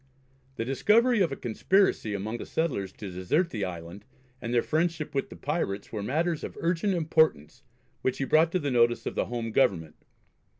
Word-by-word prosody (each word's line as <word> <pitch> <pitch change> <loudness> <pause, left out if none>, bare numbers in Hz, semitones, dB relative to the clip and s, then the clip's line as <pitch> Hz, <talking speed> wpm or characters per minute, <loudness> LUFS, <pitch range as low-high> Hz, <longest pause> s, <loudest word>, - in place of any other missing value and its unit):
The 115 - -3
discovery 215 - +3
of 170 - +2
a - - -2
conspiracy 120 - +1
among 110 +4 -3
the - - -6
settlers 125 - -1
to 100 -3 -8
desert 120 - 0
the 105 -3 -3
island, 85 +1 -6 0.4
and 115 - -4
their 120 -1 +2
friendship 160 -1 -1
with 135 - -1
the - - -10
pirates, 120 - -3
were 105 - -4
matters 160 +9 -1
of - - -7
urgent 180 +3 0
importance 160 - +1 0.4
which 130 - 0
he - - -1
brought 160 +5 +4
to 185 - +2
the 145 -3 -2
notice 120 -1 +3
of - - -3
the - - 0
home 115 -2 -4
Government. 85 - +1
130 Hz, 185 wpm, -28 LUFS, 105-165 Hz, 0.4 s, brought